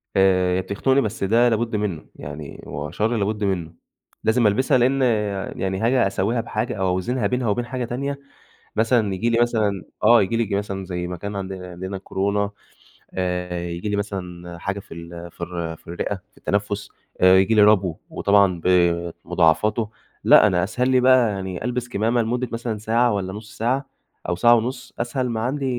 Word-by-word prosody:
آآ 95 -1 +3
بتخنقني 130 +9 +1
بس 110 -3 -3
ده 115 +5 +4
لابد 115 0 0
منه 100 -7 -2
يعني 75 0 -8
هو 75 +1 -5
شر 115 +3 0
لابد 105 +1 -1
منه، 90 -5 -1 0.5
لازم 110 0 +3
ألبسها 130 +6 +3
لإن 130 +3 +2 0.6
يعني 95 0 -1
حاجة 120 -1 +3
أساويها 105 +5 0
بحاجة 115 +1 -3
أو 95 -2 0
أوزنها 100 +5 0
بينها 125 0 -1
وبين 120 +4 0
حاجة 125 0 -3
تانية 140 +4 -3 0.6
مثلًا 110 -2 +2
ييجي 95 +5 0
لي 115 0 +2
مثلًا 110 -5 +1 0.2
آه 115 +1 +7
ييجي 115 +4 0
لي 110 -4 0
مثلًا 100 -1 -3
زي 90 -1 -4
ما 90 0 -5
كان 100 +3 -6
عندنا 95 -2 -5
عندنا 95 +2 -5
كورونا 100 +2 -1 0.6
آآ 90 -1 -2
ييجي 85 +4 -4
لي 105 - 0
مثلًا 90 -4 -5
حاجة 95 +2 -3
في - - -12
ال 85 +1 -9
في - - -16
الر 85 -2 -4
في - - -23
الرئة 85 +4 -3 0.2
في - - -32
التنفس 100 0 -2 0.3
آآ 95 0 +7
ييجي 95 +4 +3
لي 105 - +6
ربو 100 -5 +4
وطبعًا 100 -4 +3
بمضاعفاته 85 +3 +2 0.3
لأ، 105 - +7
أنا 90 -3 +1
أسهل 125 +6 0
لي 130 -1 +4
بقى 125 -2 +5
يعني 95 -2 -5
ألبس 125 0 -2
كمامة 115 +1 +1
لمدة 120 +2 -1
مثلًا 115 -1 -3
ساعة 115 +3 +2
والّا 95 -2 -2
نص 105 +1 -10
ساعة 130 +4 0 0.4
أو 90 - +1
ساعة 120 +5 +6
ونص 120 +3 -3
أسهل 125 +1 -1
ما 110 -1 -2
عندي 135 +4 -1
100 Hz, 180 wpm, -22 LUFS, 90-120 Hz, 0.6 s, آه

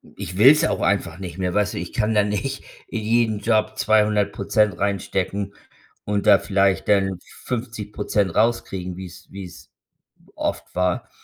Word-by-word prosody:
ich 90 -2 -6
will's 145 +8 +7
auch 160 - +1
einfach 95 -4 0
nicht 90 -2 -7
mehr, 90 -1 -1
weißt 105 -1 +1
du? - - -5
Ich 85 - -6
kann 110 0 0
da 105 -1 +4
nicht 105 +6 -3 0.2
in 115 - -4
jeden 110 -1 +1
Job 110 -1 +1
200% 105 -2 +2
reinstecken 100 0 -2 0.5
und 100 -1 -1
da 100 - +7
vielleicht 100 -2 +1
dann 95 -3 +2 0.2
50% 105 -5 -2
rauskriegen, 95 -5 0
wie's 90 -2 -10
wie's 95 -3 -10 0.7
oft - - -3
war. 90 -1 0
100 Hz, 145 wpm, -22 LUFS, 95-110 Hz, 0.7 s, will's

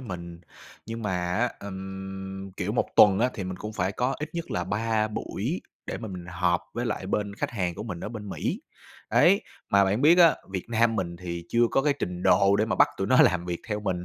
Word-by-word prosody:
mình. 85 -7 -7 0.5
Nhưng 115 0 -5
mà 105 - -1 0.2
á, 120 +1 +1
ừm, 95 0 -7
kiểu, 100 +2 -2
1 120 - +1
tuần 100 -2 +7
á 125 +2 +3
thì 100 - -4
mình 95 0 -5
cũng 105 +3 -6
phải 95 -2 -1
có 125 +5 0
ít 150 - -4
nhất 170 -1 -5
là 90 - -1
3 110 +2 0
buổi 105 - -3 0.3
để - - -4
mà 110 - -6
mình 90 -2 -7
họp 85 0 +1
với 120 +1 -2
lại 105 -4 -3
bên 100 +1 -1
khách - - -3
hàng 90 -7 -2
của - - -6
mình 95 -7 -6
ở - - -4
bên 105 -3 -7
Mỹ. - - -3 0.5
Đấy. 195 +7 +5 0.3
Mà 100 0 +5
bạn 100 +6 0
biết 165 +4 +6
á, 170 -3 +7 0.2
Việt 95 -2 -3
Nam 115 -1 +2
mình 85 -3 -2
thì 85 -1 -6
chưa 120 - +2
có 135 - +2
cái 145 0 +3
trình 90 -5 -4
độ 100 0 +5
để 105 - +2
mà 110 - -1
bắt 145 +1 +6
tụi 95 - -1
nó 130 +3 +6
làm 90 -1 +2
việc 85 -1 -3
theo 105 -1 -2
mình 90 -4 -2
100 Hz, 240 wpm, -27 LUFS, 95-115 Hz, 0.5 s, tuần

